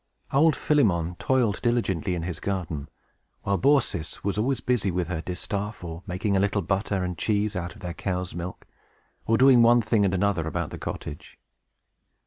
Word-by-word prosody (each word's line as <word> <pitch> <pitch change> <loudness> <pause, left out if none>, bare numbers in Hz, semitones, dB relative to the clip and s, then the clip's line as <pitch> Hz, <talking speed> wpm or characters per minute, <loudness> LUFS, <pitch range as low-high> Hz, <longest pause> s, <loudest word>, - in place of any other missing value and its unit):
Old 155 +3 +5
Philemon 90 - +2
toiled 125 -7 +1
diligently 100 -8 0
in 85 - -3
his 85 -2 -4
garden, 85 -7 -3 0.5
while 100 -1 0
Baucis 120 - +1
was 100 - -1
always 125 +5 0
busy 120 -6 0
with 90 -1 -1
her 85 -3 -2
distaff, 100 +4 -4
or 85 0 -6
making 95 +3 -1
a - - +3
little 100 0 +1
butter 95 +1 -1
and 90 -2 -4
cheese 105 -1 +1
with 90 -2 -4
their 90 -2 -4
cow's 90 0 -3
milk, 90 +1 -6 0.6
or 115 - +3
doing 130 -1 +7
one 120 0 +6
thing 110 -1 +2
and 95 -1 +2
another 95 -4 +1
about - - -3
the - - -7
cottage. 75 - -7
100 Hz, 170 wpm, -26 LUFS, 90-115 Hz, 0.6 s, doing